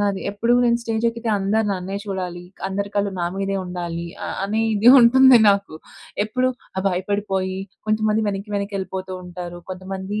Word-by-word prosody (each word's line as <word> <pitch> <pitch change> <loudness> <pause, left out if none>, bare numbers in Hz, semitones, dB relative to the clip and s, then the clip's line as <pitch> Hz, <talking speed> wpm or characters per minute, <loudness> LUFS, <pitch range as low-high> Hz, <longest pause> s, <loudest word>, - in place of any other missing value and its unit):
నాది. 200 -1 0
ఎప్పుడు 230 +4 +1
నేను 235 0 +3
స్టేజ్ 225 0 -2
ఎక్కితే 230 -1 -3
అందరూ 210 +3 +1
నన్నే 190 +1 -4
చూడాలి. 180 -2 -4 0.2
అందరి 200 +1 -3
కళ్ళు 200 -1 +1
నా 170 - 0
మీదే 195 0 -1
ఉండాలి 170 -1 -4 0.2
అ - - -4 0.2
అని 215 +3 0
ఇదే 225 +4 +6
ఉంటుంది 255 +1 +7
నాకు. 200 -5 -1 0.5
ఎప్పుడూ 255 +4 0 0.3
ఆహ్, 190 - -2
భయపడిపోయి 190 0 -2 0.3
కొంతమంది 215 0 +1
వెనక్కి 200 +1 -4
వెనక్కి 200 0 -3
వెళ్ళిపోతూ 190 0 -5
ఉంటారు. 175 0 -8
కొంతమంది 190 +2 -5
200 Hz, 160 wpm, -22 LUFS, 185-215 Hz, 0.5 s, ఉంటుంది